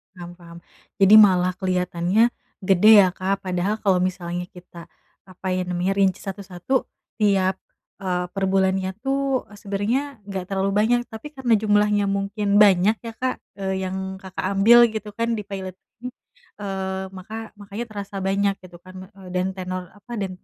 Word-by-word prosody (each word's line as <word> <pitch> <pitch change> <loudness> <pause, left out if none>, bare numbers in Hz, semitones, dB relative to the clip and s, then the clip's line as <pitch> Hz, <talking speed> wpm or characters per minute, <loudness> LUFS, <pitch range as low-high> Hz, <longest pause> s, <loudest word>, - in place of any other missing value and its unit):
Paham 175 -1 -9
paham. 170 -1 -13 0.4
Jadi 195 +1 +6
malah 185 -4 +6
keliatannya 185 +3 +1 0.3
gede 195 +2 +4 0.2
ya - - +1
Kak. 190 +1 -2
Padahal 185 +4 -1
kalo 190 -4 +2
misalnya 180 -1 -3
kita, 170 -1 -13 0.3
apa 185 0 -12
ya 185 - 0
namanya, 180 +1 -1
rinci 195 -2 +2
satu-satu 195 +5 -3 0.4
tiap, 195 -2 +2 0.5
eee, 180 -1 -1
perbulannya 190 -1 +1
tuh, 270 0 -1
eee, 210 - -14
sebenernya 205 +5 -1 0.3
nggak 195 -2 -4
terlalu 195 0 0
banyak. 225 +4 +3
Tapi 225 +5 -9
karena 265 -5 +1
jumlahnya 210 -1 +2
mungkin 200 +1 0
banyak 205 +1 +5
ya 230 - -5
Kak, 255 +2 -2 0.2
eee, 190 0 -1
yang 190 0 -5
Kakak 190 -1 -7
ambil 235 +3 +7
gitu 215 -1 -6
kan 230 +1 -1
di - - -4
paylat 190 -2 -6 0.3
ini, 250 - -5 0.5
eee, 190 -1 -4
maka 220 +4 -8
makanya 205 +2 -7
terasa 200 -1 -6
banyak 195 +1 +1
gitu 180 -1 -13
kan, 185 +1 -14 0.2
eee, 190 -1 -13
dan 180 0 0
tenor, 185 -1 -6
apa, 210 +4 -14
dan 195 -2 -2
195 Hz, 160 wpm, -23 LUFS, 185-210 Hz, 0.5 s, ambil